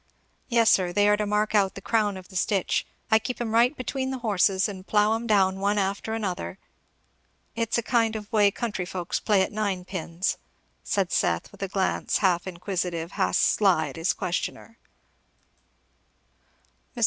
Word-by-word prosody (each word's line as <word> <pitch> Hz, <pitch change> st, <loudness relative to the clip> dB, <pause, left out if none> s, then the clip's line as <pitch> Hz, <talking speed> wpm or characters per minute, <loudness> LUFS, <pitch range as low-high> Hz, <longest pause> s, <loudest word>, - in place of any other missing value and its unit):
"Yes 230 Hz, -2 st, +4 dB
sir 180 Hz, -2 st, +3 dB
they 205 Hz, +3 st, +3 dB
are 210 Hz, 0 st, +4 dB
to 210 Hz, 0 st, -1 dB
mark 210 Hz, +1 st, 0 dB
out 200 Hz, -2 st, +2 dB
the -, -, -6 dB
crown 210 Hz, -2 st, 0 dB
of 185 Hz, -1 st, -12 dB
the 190 Hz, -, -14 dB
stitch. 190 Hz, +1 st, 0 dB, 0.2 s
I 220 Hz, -, +6 dB
keep 250 Hz, +3 st, -5 dB
'em 230 Hz, -2 st, -3 dB
right 240 Hz, +5 st, +3 dB
between 260 Hz, +1 st, -3 dB
the 265 Hz, -, -3 dB
horses 195 Hz, -2 st, +2 dB
and 190 Hz, -2 st, -8 dB
plough 210 Hz, +1 st, +3 dB
'em 230 Hz, +1 st, -3 dB
down 190 Hz, -3 st, +3 dB
one 200 Hz, +1 st, +1 dB
after 200 Hz, +3 st, -1 dB
another. 190 Hz, -4 st, -4 dB, 1.0 s
It's 230 Hz, 0 st, 0 dB
a 235 Hz, -, -1 dB
kind 230 Hz, -2 st, +1 dB
of 215 Hz, +1 st, -7 dB
way 205 Hz, -2 st, +5 dB
country 205 Hz, -3 st, -3 dB
folks 180 Hz, -1 st, -3 dB
play 205 Hz, -3 st, +3 dB
at -, -, -3 dB
ninepins," 185 Hz, -4 st, -2 dB, 0.5 s
said -, -, -1 dB
Seth, -, -, 0 dB
with -, -, -16 dB
a 195 Hz, -, -1 dB
glance 190 Hz, 0 st, 0 dB
half 180 Hz, -2 st, +1 dB
inquisitive, 175 Hz, -2 st, -3 dB
half 190 Hz, -, 0 dB
sly, 195 Hz, -4 st, +3 dB
at -, -, -10 dB
his 165 Hz, +3 st, +1 dB
questioner. 185 Hz, +4 st, -4 dB, 2.2 s
Mr. -, -, -7 dB
205 Hz, 170 wpm, -26 LUFS, 185-220 Hz, 2.2 s, I